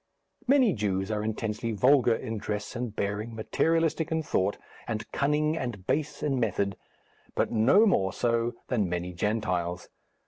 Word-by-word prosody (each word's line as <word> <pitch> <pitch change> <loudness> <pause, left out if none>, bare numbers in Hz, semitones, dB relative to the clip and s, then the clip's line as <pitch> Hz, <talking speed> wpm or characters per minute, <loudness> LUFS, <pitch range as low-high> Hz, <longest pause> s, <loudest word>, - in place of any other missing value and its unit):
Many 260 -5 +5
Jews 100 -1 -1
are 105 -1 -1
intensely 110 +1 -2
vulgar 125 +1 +4
in 110 -1 -4
dress 105 +1 -4
and 120 -3 -4
bearing, 105 +3 -2
materialistic 165 +7 +1
in 160 0 0
thought, 100 -7 0 0.3
and 110 -2 -3
cunning 150 +2 +1
and 120 - -4
base 150 +5 -1
in 140 -3 +1
method, 100 -3 0 0.6
but - - +1
no 130 - +5
more 95 - +2
so 115 +3 0
than 105 -8 0
many 90 +1 -3
Gentiles. 90 -3 -1
115 Hz, 145 wpm, -28 LUFS, 100-140 Hz, 0.6 s, Many